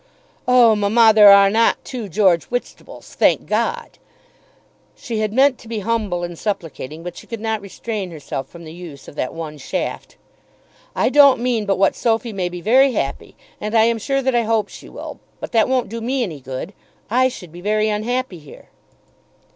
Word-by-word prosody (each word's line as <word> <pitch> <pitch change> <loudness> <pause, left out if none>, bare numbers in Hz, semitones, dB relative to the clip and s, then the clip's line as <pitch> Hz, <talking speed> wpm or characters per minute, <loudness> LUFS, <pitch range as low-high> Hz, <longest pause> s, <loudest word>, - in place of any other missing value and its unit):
"Oh, 245 -3 +6
mamma, 220 +2 +4
there 210 -1 +8
are 200 0 +7
not 225 +2 +2
two 235 -6 -6
George 185 -3 +2
Whitstables; 245 0 -7
thank - - +2
God." - - -2 1.0
She 230 -3 -5
had 215 -1 -1
meant 265 +2 +3
to - - -15
be 225 -2 -4
humble 205 -5 -1
and 175 -1 -6
supplicating, 165 -6 -5
but 175 - -7
she - - -12
could 230 - -6
not 220 -1 -2
restrain 200 0 -5
herself 145 -4 -6
from 170 -1 -12
the 160 -1 -10
use 170 -5 -11
of - - -11
that 130 -3 -3
one 155 -2 -7
shaft. - - -5 0.8
"I - - +2
don't 280 -3 +6
mean 235 -3 -1
but 195 - +1
what 195 +1 +2
Sophy 230 -1 -1
may 185 -3 -2
be 175 0 -8
very 260 +7 +4
happy, 140 -10 -4 0.2
and 215 +2 -4
I 220 - +6
am 230 0 +1
sure 275 +4 -1
that 265 0 +1
I 240 - +3
hope 220 -2 0
she - - -12
will. - - -9 0.2
But - - -7
that 225 0 +2
won't 255 -2 +1
do 230 +2 -6
me 255 +2 -1
any 165 -10 -5
good. 135 +8 -7 0.4
I 255 +2 +4
should 180 -10 -9
be 175 +2 -11
very 215 +2 +1
unhappy 215 -1 -2
here." 150 -2 -15
215 Hz, 195 wpm, -20 LUFS, 175-235 Hz, 1.0 s, there